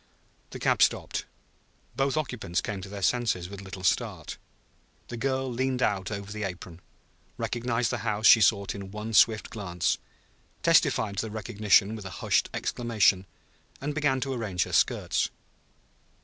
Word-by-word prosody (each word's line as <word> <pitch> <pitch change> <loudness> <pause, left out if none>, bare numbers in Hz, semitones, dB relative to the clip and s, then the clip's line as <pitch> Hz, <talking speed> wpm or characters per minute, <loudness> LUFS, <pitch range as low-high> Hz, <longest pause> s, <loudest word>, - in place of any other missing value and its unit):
The - - -8
cab - - +1
stopped. - - +1 0.7
Both 135 +3 0
occupants 115 - -2
came 100 -2 -4
to 95 - -8
their 100 -1 -6
senses 110 -8 +1
with 100 -1 -8
a - - -11
little 95 -1 -9
start. 90 - -1 0.7
The 120 - -5
girl 130 +2 -1
leaned 130 +1 -1
out 95 -3 0
over; 100 -1 -6
the 105 +1 -5
apron, 90 -3 -6 0.6
recognized 120 -1 -1
the 120 - -2
house 105 -1 -2
she 110 - +9
sought 100 0 +3
in 100 -1 -7
one 105 +2 -6
swift 110 0 +4
glance, 90 -6 -1 0.6
testified 100 -2 +3
to 110 - -1
the - - -8
recognition 105 -1 +2
with 105 -3 -8
a - - -5 0.2
hushed - - +2
exclamation, 105 -5 +1 0.5
and 145 +2 -3
began 145 -3 +1
to 135 0 -2
arrange 100 -8 -1
her - - -8
skirts. - - +2
105 Hz, 160 wpm, -27 LUFS, 95-120 Hz, 0.7 s, she